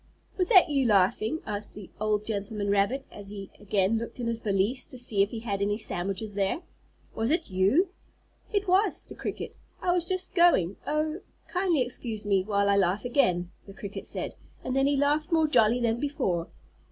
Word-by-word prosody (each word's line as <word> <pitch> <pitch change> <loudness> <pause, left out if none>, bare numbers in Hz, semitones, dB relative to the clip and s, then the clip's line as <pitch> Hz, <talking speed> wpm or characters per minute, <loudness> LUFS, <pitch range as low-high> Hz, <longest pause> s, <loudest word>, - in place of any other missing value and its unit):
"Was 365 -1 +1
that 375 -6 +8
you 275 -3 +2
laughing?" 215 +7 +2
asked 210 -1 -4
the 205 -3 -10
old 210 0 0
gentleman 205 -1 -2
rabbit, 205 +7 +1
as 200 -1 -9
he 200 -1 -8
again 205 +1 +1
looked 230 +2 -7
in 240 - -2
his 230 -1 -1
valise 210 +4 0
to 255 - -11
see 230 -5 +2
if 200 - +3
he 225 0 -6
had 200 -4 -3
any 205 +1 +1
sandwiches 195 +1 -3
there. 200 - -1 0.5
"Was 225 +1 -1
it 320 - 0
you?" 200 - +3 0.6
"It 405 -1 0
was," 380 +4 +3
said - - -22
the - - -11
cricket. - - -5 0.2
"I 355 - +1
was 350 -1 0
just 370 0 -1
going 340 - +4
Oh, 305 +3 0 0.3
kindly 355 -7 +1
excuse 230 -3 -3
me, 200 -2 +3
while 200 +1 +1
I 200 0 +4
laugh 195 +2 +1
again!" 180 -9 +1 0.2
the 195 - -11
cricket 200 -2 -6
said, - - -3 0.3
and 255 - -2
then 270 0 +3
he 285 0 +2
laughed 295 +4 +1
more 320 -1 +4
jolly 235 -5 +4
than 235 -1 +1
before. 190 - -1
225 Hz, 195 wpm, -28 LUFS, 200-290 Hz, 0.6 s, that